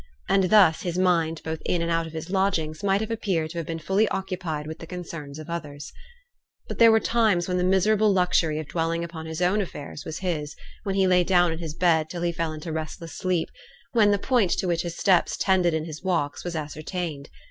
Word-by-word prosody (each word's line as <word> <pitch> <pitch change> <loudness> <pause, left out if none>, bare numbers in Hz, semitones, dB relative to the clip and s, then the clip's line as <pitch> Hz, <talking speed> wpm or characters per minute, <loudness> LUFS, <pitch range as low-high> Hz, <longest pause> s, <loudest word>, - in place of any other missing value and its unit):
And 195 -1 +3
thus 185 -4 +5
his 175 -1 -3
mind 165 -3 +1
both 160 0 -4
in 170 -1 0
and 170 - -1
out 165 0 0
of 160 - -11
his 160 +2 -6
lodgings 170 -5 0
might 195 0 +2
have 220 +1 -3
appeared 185 -8 -1
to 170 - -4
have 165 - -5
been 165 - -3
fully 195 +7 +1
occupied 180 -7 -3
with 160 +1 -7
the 165 - -9
concerns 165 -5 -7
of 155 - -9
others. 150 -4 -6 0.7
But - - -6
there 230 -1 +8
were 220 - +5
times 220 -7 +2
when 180 -1 0
the - - +1
miserable 205 +3 +3
luxury 180 -4 +2
of 155 -2 -5
dwelling 165 +1 -1
upon 165 -1 -7
his 160 +2 -3
own 195 +4 +2
affairs 150 -5 -7
was 155 +1 -5
his 160 -5 -3 0.3
when 195 -3 -2
he 195 -1 +3
lay 180 -1 +4
down 175 -1 +3
in 160 - -4
his 160 -3 -6
bed 160 -3 +2
till 175 -1 -5
he 175 - +1
fell 165 -1 -2
into 155 +1 -6
restless 160 +1 -5
sleep 180 -3 -1 0.4
when 220 -4 +4
the 205 - +3
point 230 -2 +2
to - - -1
which 170 -1 +1
his 170 -1 -5
steps 185 -4 +3
tended 180 -4 +2
in 160 0 -2
his 155 -2 -8
walks 170 -6 -1
was 175 -1 -4
ascertained. 155 0 -5
170 Hz, 225 wpm, -25 LUFS, 160-190 Hz, 0.7 s, there